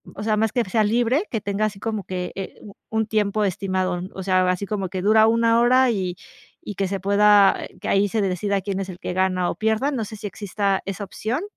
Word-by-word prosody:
o 205 - -6
sea, 215 -1 +1
más 220 0 +1
que 245 -2 +2
sea 215 +3 +1
libre, 240 - +1
que 225 - -2
tenga 200 +1 -1
así 205 -2 -4
como 215 -1 -3
que, 180 -1 -4
eh, 195 -1 -6
u 205 - -12 0.2
un 220 0 0
tiempo 215 -1 0
estimado, 185 -1 -1
o 190 - -5
sea, 185 -1 +2
así 185 +2 -1
como 195 -2 -3
que 185 +1 -4
dura 220 +2 +5
1 230 0 +3
hora 255 +1 +4
y 185 -5 -2 0.5
y 205 - -7
que 195 +1 -1
se 195 +1 -3
pueda 200 +1 +5 0.2
que - - -5
ahí 200 +1 +3
se 220 +2 0
decida 195 +1 -1
quién 195 0 -3
es 195 -1 -4
el 180 -1 -9
que 190 - -4
gana 185 -1 +1
o - - -3
pierda, 220 - 0
no 240 -6 -2
sé 215 - -9
si 205 - -9
exista 200 0 -1
esa 195 +1 -4
opción. 225 - -3
205 Hz, 240 wpm, -23 LUFS, 190-220 Hz, 0.5 s, dura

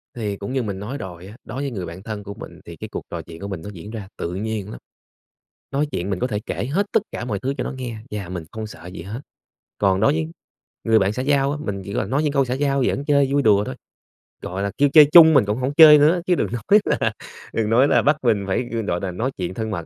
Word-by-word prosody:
Thì 105 -4 -3
cũng 100 +5 -6
như 130 -2 0
mình 100 -3 -4
nói 120 +8 -5
rồi 90 -3 -8
á, 105 - -12
đối 130 +5 -6
với 140 -2 -3
người 95 -5 -4
bạn 85 +3 -9
thân 105 -2 -6
của 100 0 -7
mình - - -11
thì - - -9
cái - - -8
cuộc - - -6
trò 85 -1 -5
chuyện 80 0 -12
của 100 - -5
mình 95 -5 -5
nó 105 - -7
diễn 95 +4 -9
ra 110 -4 -7
tự 85 - -4
nhiên 105 0 -4
lắm. - - -9 0.9
Nói 145 +2 0
chuyện 90 +3 -3
mình 95 - -1
có 125 - 0
thể 105 -5 -3
kể - - -3
hết 200 +4 +1
tất - - +4
cả - - -4
mọi 105 -5 -2
thứ 135 +2 -2
cho - - -1
nó - - -4
nghe 125 -4 -6
và 100 -4 -5
mình 90 -2 -5
không 110 0 -5
sợ 105 -4 -12
gì 90 -2 -8
hết. 105 +8 -6 0.6
Còn 95 -2 +2
đối 110 - +4
với 80 0 -1 0.6
người 110 -1 +4
bạn 95 +1 +1
xã 125 - -3
giao 140 0 +2
á, 150 - -3
mình 100 -2 -3
chỉ 100 - -6
cần 100 - -2
nói 145 +4 +1
những 150 - +1
câu 135 -2 +3
xã 125 - -2
giao 140 0 +1
giỡn 140 - -1
chơi 140 -2 +3
vui 140 0 +3
đùa 105 -5 +4
thôi, - - -6 0.7
gọi 95 +2 -4
là, 100 - -2
kêu 145 0 +4
chơi 155 -2 +10
chung 160 -2 +9
mình 120 - +5
cũng 105 +2 -1
hổng 130 +2 -2
chơi 150 -1 +9
nữa 160 +4 +4
chứ 180 -1 +3
đừng - - 0
nói 120 - +3 0.2
là - - 0 0.4
đừng 110 -2 0
nói 125 +5 +4
là - - +4
bắt 150 0 +3
mình 110 -4 +2
phải, 110 +6 -1
ư, 115 - -1
gọi 90 -5 -2
nà, 95 -2 -4
nói 115 +9 -2
chuyện 90 -1 -3
thân 110 +2 -4
mật, 85 -5 -4
110 Hz, 285 wpm, -22 LUFS, 95-135 Hz, 0.9 s, chơi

